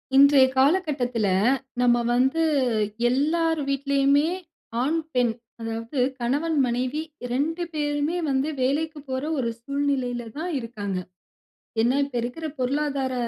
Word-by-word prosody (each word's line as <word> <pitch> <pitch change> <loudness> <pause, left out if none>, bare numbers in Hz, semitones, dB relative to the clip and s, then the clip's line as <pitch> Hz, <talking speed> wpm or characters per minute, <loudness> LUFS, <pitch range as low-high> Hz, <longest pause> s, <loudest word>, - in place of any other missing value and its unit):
இன்றைய 280 -1 +7
காலகட்டத்தில, 265 - +2 0.5
நம்ம 240 -1 +4
வந்து 265 +7 +2 0.7
எல்லார் 320 +5 +1
வீட்லயுமே 280 +2 +2 0.5
ஆண், 305 +6 +1
பெண், 245 -3 +2 0.3
அதாவது 225 +4 -4 0.2
கணவன், 290 +7 0
மனைவி 250 +5 -1 0.3
2 325 +7 0
பேருமே 295 +2 -1
வந்து 270 +2 +1
வேலைக்கு 300 +4 0
போற 260 +1 -2 0.2
ஒரு 235 -3 0
சூழ்நிலையில 260 -3 -1
தான் 345 +3 -3
இருக்காங்க. 210 -5 -4 0.9
ஏன்னா, 245 +3 +3
இப்ப 275 -3 -10
இருக்கிற 280 +7 -4
பொருளாதார 275 0 0
275 Hz, 110 wpm, -25 LUFS, 245-300 Hz, 0.9 s, இன்றைய